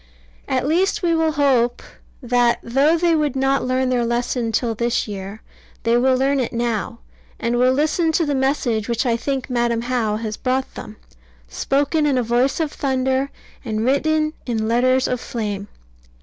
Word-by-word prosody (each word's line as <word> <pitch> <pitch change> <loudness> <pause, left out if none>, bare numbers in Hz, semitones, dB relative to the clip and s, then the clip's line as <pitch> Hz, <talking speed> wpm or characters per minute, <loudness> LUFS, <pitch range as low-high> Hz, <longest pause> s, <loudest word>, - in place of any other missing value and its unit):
At 260 0 0
least 370 +7 +1
we 340 -1 +2
will 320 -1 +1
hope 255 -5 +2 0.4
that, 245 -1 +2
though 275 +7 +3
they 340 0 +2
would 300 -4 0
not 270 +1 +1
learn 255 0 0
their 245 -1 +1
lesson 235 0 -1
till 230 +1 0
this 235 +2 -1
year, 200 +1 -7 0.4
they 230 0 +2
will 255 +1 +3
learn 275 +1 +1
it 250 - -2
now, 230 - -2 0.4
and 235 +1 0
will 255 +1 +4
listen 310 +4 +1
to 330 - +2
the 290 - -1
message 260 -5 0
which 235 +3 0
I 235 -2 +2
think 265 +2 -3
Madam 235 -2 0
How 240 -4 0
has 215 -1 -4
brought 260 0 -1
them, 210 - -9 0.5
spoken 285 - 0
in 275 -3 +2
a 250 - +1
voice 245 +5 +1
of 315 -3 -1
thunder, 265 0 0 0.3
and 220 -2 -2
written 305 +3 +1
in 220 -2 -1
letters 255 +3 +2
of 250 -1 -2
flame. 205 -3 -4
255 Hz, 175 wpm, -21 LUFS, 235-280 Hz, 0.5 s, will